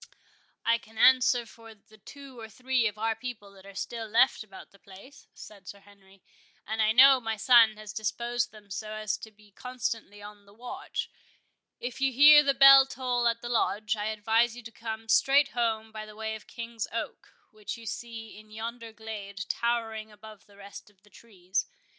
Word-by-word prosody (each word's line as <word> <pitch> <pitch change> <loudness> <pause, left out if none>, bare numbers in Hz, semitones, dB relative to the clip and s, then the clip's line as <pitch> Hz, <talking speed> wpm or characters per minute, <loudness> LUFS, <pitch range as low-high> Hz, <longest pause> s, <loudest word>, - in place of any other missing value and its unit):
"I 230 0 +2
can 220 0 -19
answer 250 0 +4
for 225 0 -15
the 215 +1 -23
two 270 +3 -13
or 225 -1 -9
three 255 0 0
of 210 -1 -6
our 225 +1 0
people 230 -6 -8
that 195 0 -17
are 200 - -13
still 230 +2 -5
left 230 +2 +2
about 195 -3 -14
the 200 - -22
place," 200 +10 -16
said 200 -3 -14
Sir 200 - -10
Henry; 195 -1 -22 0.4
"and 220 +1 -2
I 215 0 +3
know 265 +3 +7
my 225 -2 -3
son 225 -1 +5
has 215 -1 -9
disposed 240 +3 -2
them 210 -2 -17
so 215 +3 -6
as 215 0 -3
to 220 - -10
be 210 -1 -23
constantly 230 -3 -5
on 205 0 -13
the 200 - -19
watch. 245 +2 -6 0.7
If 245 +1 -7
you 270 0 +2
hear 295 +3 +8
the 275 -2 +1
bell 275 0 +8
toll 245 -2 -1
at 230 0 -1
the 240 - -5
Lodge, 215 -2 0
I 210 -1 -4
advise 220 +2 +1
you 245 - -11
to 225 - -10
come 225 -1 -7
straight 275 +5 +4
home 225 -3 -2
by 215 -1 -8
the 215 - -13
way 220 0 -4
of 220 - -10
the - - -18
King's 230 -2 -5
Oak, 230 +1 -6 0.2
which 215 +2 -7
you 230 - -13
see 225 -1 -8
in 215 0 -18
yonder 230 +1 -7
glade 205 -2 -8
towering 225 -2 -2
above 215 0 -15
the 200 -1 -21
rest 200 +1 -12
of 200 -1 -31
the 210 - -24
trees. 190 -4 -5
220 Hz, 200 wpm, -28 LUFS, 210-240 Hz, 0.7 s, hear